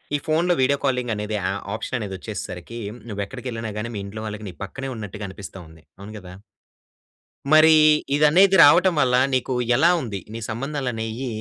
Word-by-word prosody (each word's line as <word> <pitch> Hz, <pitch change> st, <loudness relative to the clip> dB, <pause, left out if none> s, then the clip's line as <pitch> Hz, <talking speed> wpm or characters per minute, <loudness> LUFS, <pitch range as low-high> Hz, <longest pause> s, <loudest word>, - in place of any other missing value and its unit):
ఈ -, -, +2 dB
ఫోన్‌లో 170 Hz, +3 st, +2 dB
video 140 Hz, +2 st, +2 dB
calling 125 Hz, -3 st, 0 dB
అనేది 105 Hz, +1 st, -4 dB
యా 90 Hz, -, -4 dB, 0.3 s
ఆప్షన్ 115 Hz, +3 st, -3 dB
అనేదోచ్చేసేసరికి 100 Hz, +1 st, -7 dB, 0.3 s
నువ్వు 100 Hz, -3 st, -5 dB
ఎక్కడికెళ్ళినా 115 Hz, -2 st, -6 dB
గాని 115 Hz, +2 st, -5 dB
మీ 100 Hz, -, -3 dB
ఇంట్లో 110 Hz, +2 st, -7 dB
వాళ్ళకి 105 Hz, 0 st, -7 dB
నీ -, -, -10 dB
పక్కనే 135 Hz, +7 st, -6 dB
ఉన్నట్టుగా 105 Hz, -1 st, -7 dB
అనిపిస్తుంది. 90 Hz, -5 st, -11 dB, 0.2 s
అవును 100 Hz, +2 st, -10 dB
కదా? 90 Hz, -1 st, -12 dB, 1.2 s
మరి 155 Hz, +1 st, +7 dB, 0.4 s
ఇదనేది 175 Hz, +7 st, +5 dB
రావటం 175 Hz, +5 st, +5 dB
వల్ల 125 Hz, -1 st, +2 dB, 0.2 s
నీకు 130 Hz, 0 st, -1 dB, 0.2 s
ఎలా 170 Hz, +5 st, +5 dB
ఉంది? 105 Hz, -5 st, -5 dB, 0.2 s
నీ -, -, -5 dB
సంబంధాలు 135 Hz, +3 st, -3 dB
అనేయి 115 Hz, +3 st, -4 dB
115 Hz, 160 wpm, -22 LUFS, 105-140 Hz, 1.2 s, మరి